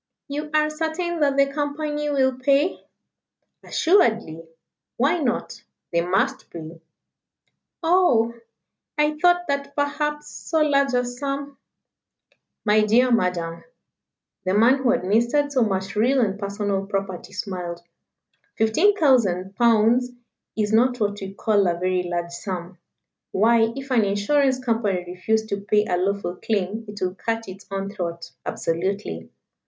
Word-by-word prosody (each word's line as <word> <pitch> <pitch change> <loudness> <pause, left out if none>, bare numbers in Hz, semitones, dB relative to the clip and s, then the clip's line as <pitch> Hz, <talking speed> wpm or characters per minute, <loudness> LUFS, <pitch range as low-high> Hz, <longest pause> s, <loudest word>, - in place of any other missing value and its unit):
"You 295 +1 -4
are 305 0 +2
certain 325 +2 -2
that 280 -2 +2
the 275 - +6
Company 295 +1 -3
will 265 -2 +2
pay?" 280 +6 +2 0.8
"Assuredly. 225 - +2 0.6
Why 280 +8 +2
not? 255 -6 -2 0.3
They 170 -1 +2
must 225 +10 0
pay." 165 0 -9 1.0
"Oh! 325 -10 +3 0.6
I 300 0 +1
thought 355 +1 +3
that 280 0 -2
perhaps 295 +1 -1
so 320 +1 -2
large 280 -3 +2
a 245 0 +2
sum 275 +3 -4 0.6
" - - -44
"My 215 0 +4
dear 240 +4 +3
Madam" 180 -6 0 0.8
the 185 +1 0
man 235 +6 +5
who 260 -2 +1
administered 240 +5 +2
so 265 -3 +2
much 190 -2 -2
real 250 +6 +3
and 200 -3 0
personal 200 -1 -2
property 195 -3 -4
smiled 180 -5 -5 0.7
"fifteen 320 - +3
thousand 195 - +2
pounds 235 +2 +3 0.5
is 210 0 0
not 245 +2 +3
what 205 -1 -1
we 195 0 -7
call 205 -2 +2
a 170 -1 0
very 185 +1 0
large 175 0 -3
sum. 180 0 -6 0.5
Why, 225 +2 +3
if 270 0 -7
an 235 -4 +4
Insurance 260 +7 +2
Company 225 -7 -1
refused 200 +5 -1
to 200 0 -2
pay 210 +1 +2
a 180 - 0
lawful 190 -1 -1
claim 215 +1 -2
it 205 0 -8
would 185 +1 -3
cut 225 0 -2
its 190 +2 -10
own 195 0 -4
throat 170 -4 -5 0.2
absolutely. 165 - -3
225 Hz, 140 wpm, -23 LUFS, 195-280 Hz, 1.0 s, the